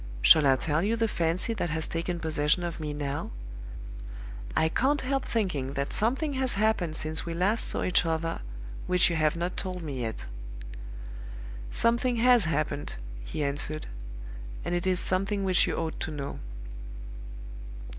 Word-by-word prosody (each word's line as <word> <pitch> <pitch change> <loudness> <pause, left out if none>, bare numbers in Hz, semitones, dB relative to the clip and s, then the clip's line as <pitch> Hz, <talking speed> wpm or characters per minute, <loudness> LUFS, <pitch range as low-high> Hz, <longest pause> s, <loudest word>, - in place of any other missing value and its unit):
'Shall 150 - +8
I 135 - +6
tell 155 +3 0
you 210 +5 +1
the 225 0 +1
fancy 175 +3 0
that 190 -6 -2
has 155 0 0
taken 170 +1 -2
possession 155 +1 +2
of 170 -1 -4
me 150 -1 -3
now? 145 -1 -3 1.3
I 160 - +4
can't 270 - +2
help 270 +1 -1
thinking 155 - -1
that 140 0 -2
something 270 +7 +2
has 260 -4 +3
happened 200 -6 +1
since 155 0 +1
we 170 -1 -4
last 200 +6 +2
saw - - 0
each 180 - +3
other 165 0 -1 0.5
which 180 -1 +4
you - - 0
have 155 -1 +2
not 175 +2 -2
told 180 -2 -3
me 140 -5 -4
yet. 110 - -4 1.4
"'Something 235 - +3
has 240 -3 +6
happened,' 155 -2 -1 0.3
he 145 - -3
answered. 145 +2 -1 0.8
'And - - -1
it 175 +1 0
is 185 -1 +3
something 195 +2 +2
which 185 -1 +3
you - - -1
ought 160 -1 -3
to - - -2
know. 145 -2 -5
170 Hz, 160 wpm, -28 LUFS, 155-210 Hz, 1.4 s, Shall